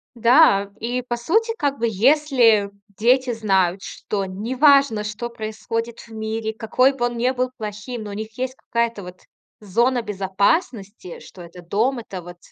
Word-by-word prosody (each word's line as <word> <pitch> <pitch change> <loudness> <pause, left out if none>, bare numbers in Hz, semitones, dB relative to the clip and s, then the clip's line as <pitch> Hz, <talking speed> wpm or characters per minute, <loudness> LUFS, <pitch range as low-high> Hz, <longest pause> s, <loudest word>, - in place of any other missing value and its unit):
Да! 230 -4 +4
И, 245 +3 -2
по 240 -1 -3
сути, 445 - +1
как 280 -1 -1
бы, 235 - 0
если 235 -2 +3 0.2
дети 245 +5 +2
знают, 190 -4 +1
что 200 -2 -4
неважно, 245 +4 +3
что 210 +3 -5
происходит 230 +1 -5
в - - -14
мире, 220 0 -3
какой 240 +4 +2
бы 245 -3 -1
он 240 0 -4
не 245 +2 +1
был 255 0 -1
плохим, 215 +2 -6
но 205 - -7
у - - -7
них 215 +2 -7
есть 255 0 -3
какая-то, 235 -4 -2
вот, 180 0 -11 0.4
зона 235 +5 +1
безопасности. 200 - -2
Что 180 - -13
это 175 +1 -12
дом, 220 +9 0
это, 190 -5 -8
вот, 175 0 -11
225 Hz, 165 wpm, -21 LUFS, 205-250 Hz, 0.4 s, Да